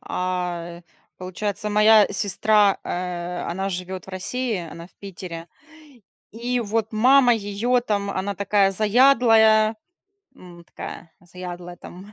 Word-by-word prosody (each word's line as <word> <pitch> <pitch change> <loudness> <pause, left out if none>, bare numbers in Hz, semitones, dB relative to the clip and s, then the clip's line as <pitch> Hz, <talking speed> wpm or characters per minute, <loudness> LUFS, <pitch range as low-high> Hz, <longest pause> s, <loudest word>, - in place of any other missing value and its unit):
А, 175 -2 -4
э, - - -26 0.4
получается, 200 +3 -4
моя 210 0 +5
сестра, 205 +1 +2
э, 175 0 -4
она 190 +3 -3
живет 185 0 -6
в - - -10
России, 230 +5 -3
она 170 +1 -10
в - - -26
Питере, 175 -4 -8 0.9
и 240 +3 -2
вот 220 0 -2
мама 250 +3 +5
её 225 +4 -1
там, 205 -4 -2
она 195 +1 -3
такая 200 0 +2
заядлая, 220 0 +4 0.6
м, 175 -1 -14
такая 170 0 -10
заядлая 175 0 -9
там 190 +4 -13
200 Hz, 125 wpm, -22 LUFS, 180-220 Hz, 0.9 s, моя